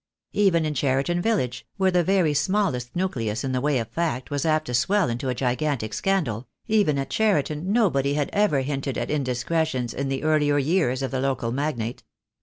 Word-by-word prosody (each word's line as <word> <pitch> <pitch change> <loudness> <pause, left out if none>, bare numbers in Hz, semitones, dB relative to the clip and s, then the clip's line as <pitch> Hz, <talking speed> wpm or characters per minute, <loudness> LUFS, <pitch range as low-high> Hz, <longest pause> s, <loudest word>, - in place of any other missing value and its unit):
Even 185 -6 +3
in 155 - -1
Cheriton 140 +5 0
village, 175 - -1
where 190 -1 +3
the 180 -1 +3
very 180 -4 +2
smallest 145 -6 0
nucleus 125 - -2
in 135 - -2
the 130 -1 0
way 145 0 +1
of 115 -3 -2
fact 155 -6 -2
was 145 +2 -1
apt 155 0 +2
to 125 - -5
swell 180 +5 +2
into 125 +3 -3
a 125 - -1
gigantic 125 -3 -1
scandal, 130 - -1 0.2
even 205 -10 +2
at 135 -1 -3
Cheriton 185 -5 +1
nobody 145 - +2
had 145 -1 -1
ever 200 -10 +2
hinted 135 -1 -3
at - - -2
indiscretions 130 -1 -1
in 135 0 -3
the 135 +1 -2
earlier 150 -2 +3
years 140 -3 +1
of 135 - -2
the 130 - -1
local 130 -4 -1
magnate. 125 -4 -2
145 Hz, 190 wpm, -24 LUFS, 130-170 Hz, 0.2 s, Even